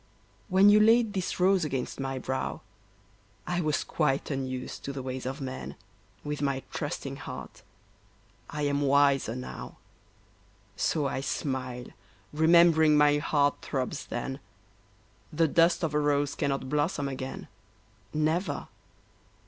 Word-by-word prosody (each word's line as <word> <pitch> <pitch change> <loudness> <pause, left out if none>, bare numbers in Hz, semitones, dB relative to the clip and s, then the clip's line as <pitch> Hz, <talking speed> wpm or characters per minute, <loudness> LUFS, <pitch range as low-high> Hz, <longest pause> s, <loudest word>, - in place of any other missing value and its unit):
When 195 +2 +6
you 210 - +7
laid 225 0 +5
this 185 -2 -3
rose 185 0 +4
against 135 -4 -3
my 135 0 -3
brow, 130 +1 -3 0.8
I 175 0 -1
was 155 -4 0
quite 150 -2 0
unused 130 -2 -4
to 140 - -3
the 135 -1 -6
ways 130 0 -4
of 135 +3 -4
men, 130 -1 -6 0.5
With 150 0 -4
my 140 -2 -1
trusting - - -4
heart; - - -8 0.9
I 150 0 -3
am 145 0 +1
wiser 140 -4 +3
now, 125 - -7 1.0
So 155 -3 0
I 135 - -1
smile, 130 -3 -3 0.5
remembering 160 -1 +5
my 145 0 +5
heart 145 -1 +1
throbs 130 -3 -3
then, 135 +3 -4 0.9
The 165 +1 +2
dust 170 +3 +3
of 155 -2 0
a 150 - +2
rose 145 -1 +1
cannot 140 -2 -2
blossom 145 +1 0
again, 130 -1 -6 0.6
Never. 155 +5 -1
145 Hz, 130 wpm, -28 LUFS, 135-160 Hz, 1.0 s, you